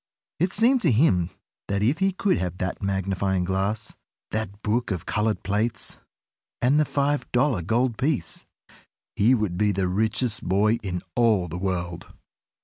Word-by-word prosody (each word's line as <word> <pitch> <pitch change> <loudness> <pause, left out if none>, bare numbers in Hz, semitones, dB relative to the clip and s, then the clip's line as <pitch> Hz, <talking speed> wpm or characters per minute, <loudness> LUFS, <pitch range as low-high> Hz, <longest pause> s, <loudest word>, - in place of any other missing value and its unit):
It 180 +3 +1
seemed 240 +5 +4
to 165 - +3
him 95 - +3 0.4
that 100 0 0
if 135 +9 +2
he 195 0 +2
could 190 0 +1
have 90 -1 -3
that 90 -1 -3
magnifying 95 -1 0
glass, 95 +4 -2 0.4
that 105 -2 -4
book 115 +3 0
of 90 -5 -3
colored 105 +1 0
plates, 105 +1 0 0.6
and 135 +5 +3
the 155 - +3
five 145 +1 -1
dollar 125 -5 +2
gold 115 +6 0
piece, 140 0 0 0.7
he 120 +6 +4
would 100 -6 -2
be 105 -1 +3
the 95 -1 0
richest 110 +4 0
boy 105 +5 +2
in 90 -3 -4
all 110 -7 +3
the 85 +2 -5
world! 90 -2 -3
105 Hz, 155 wpm, -25 LUFS, 95-125 Hz, 0.7 s, seemed